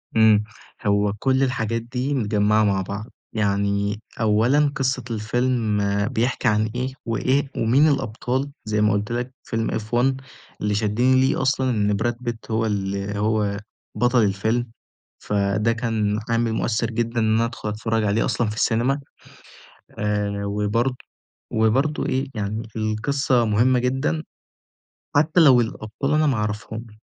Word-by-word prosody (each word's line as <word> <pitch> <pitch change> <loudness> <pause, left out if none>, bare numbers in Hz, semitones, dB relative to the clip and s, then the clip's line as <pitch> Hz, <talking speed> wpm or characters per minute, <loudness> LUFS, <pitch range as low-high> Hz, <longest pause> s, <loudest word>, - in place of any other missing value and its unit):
إمم، 110 -2 +5 0.4
هو 100 0 +2
كل 130 +1 +2
الحاجات 115 -3 -1
دي 125 +4 -3
متجمعة 105 -3 +2
مع 100 -2 +2
بعض، 100 +3 -5 0.3
يعني 100 0 0 0.2
أولًا 120 +7 +3
قصة 130 -1 0
الفيلم 115 0 0 0.3
بيحكي 125 +3 0
عن 110 0 +2
إيه، 130 +1 -2
وإيه 130 +5 0
ومين 130 +7 +4
الأبطال 130 0 -1
زي 105 -1 0
ما 105 -1 +3
قُلت 105 +2 -2
لَك 120 +2 -3
فيلم 115 -1 -2
F1 125 +5 0 0.4
اللي 105 0 0
شدّني 120 +5 +2
ليه 130 - +1
أصلًا 130 0 +1
إن 105 -3 +1
براد 120 +4 0
بيت 120 -2 -5
هو 110 +1 +1
ال 100 -1 -2
هو 105 -1 0 0.4
بطل 120 -1 +3
الفيلم، 110 +4 0 0.5
فده 100 +2 0
كان 110 -3 -1
عامل 115 -1 +1
مؤثِّرجدًا 115 +1 -1
إن 110 -1 +2
أنا 115 +1 +2
أدخُل 115 -2 -5
أتفرج 110 +1 -1
عليه 105 +2 +1
أصلًا 120 - 0
في 105 - -5
السينما 120 +6 +1 1.0
آآ، 105 -1 -1
وبرضه 105 +5 0 0.6
وبرضه 130 +8 +1
إيه 130 +1 0
يعني 110 +1 -3
القصة 120 +4 +1
مهمة 115 +4 +3
جدًا، 135 +5 0 0.9
حتى 155 +4 +3
لو 135 -7 +7
الأبطال 115 +5 -3
أنا 155 0 +3
ما 135 - +2
أعرفهمش، 110 +1 -4
115 Hz, 135 wpm, -23 LUFS, 105-125 Hz, 1.0 s, لو